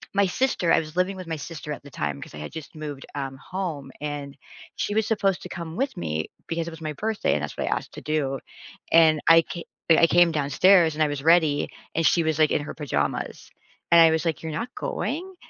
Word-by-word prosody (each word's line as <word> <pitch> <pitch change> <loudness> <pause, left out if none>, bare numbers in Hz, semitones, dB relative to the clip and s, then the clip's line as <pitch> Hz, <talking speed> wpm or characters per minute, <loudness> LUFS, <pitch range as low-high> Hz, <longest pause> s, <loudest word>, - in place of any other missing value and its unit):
my 200 0 +4
sister 185 -5 +1
I - - +5
was 155 -1 -7
living 185 +2 +1
with 185 -2 -8
my 165 - -2
sister 150 0 -7
at - - -9
the 145 - -13
time 75 - -3
'cause - - -10
I - - -8
had 75 - -7
just 160 -2 -9
moved, 150 -3 -7
um, 135 -2 -4
home, 155 -5 -5
and 145 -2 -5 0.4
she 205 - -2
was 220 -1 +2
supposed 195 -4 +1
to - - -8
come 170 -2 -6
with 270 +4 -1
me 80 -1 -3 0.2
because 165 0 -2
it 170 - -5
was 160 - -11
my 155 -1 -3
birthday 215 +7 -1
and 75 - 0
that's 75 - -5
what - - -2
I - - +1
asked - - -8
to - - -8
do. 140 -3 -1 0.5
And 160 -2 +6
I 165 0 +8
ca 170 0 -7 0.3
I 165 +1 +7
came 175 0 +5
downstairs, 160 +3 +4
and 155 - +2
I - - +3
was 145 -1 -3
ready, 160 -3 +4 0.3
and 165 - +1
she 170 - +4
was, 160 -1 0
like, 155 -1 +4
in - - +1
her 150 - -6
pajamas, 75 - -3 0.4
and 170 0 +8
I 165 - +8
was, 160 +1 0
like, 165 -3 -1
"You're 160 - -4
not 230 +11 -4
going?" 345 - -3
160 Hz, 240 wpm, -25 LUFS, 145-175 Hz, 0.5 s, I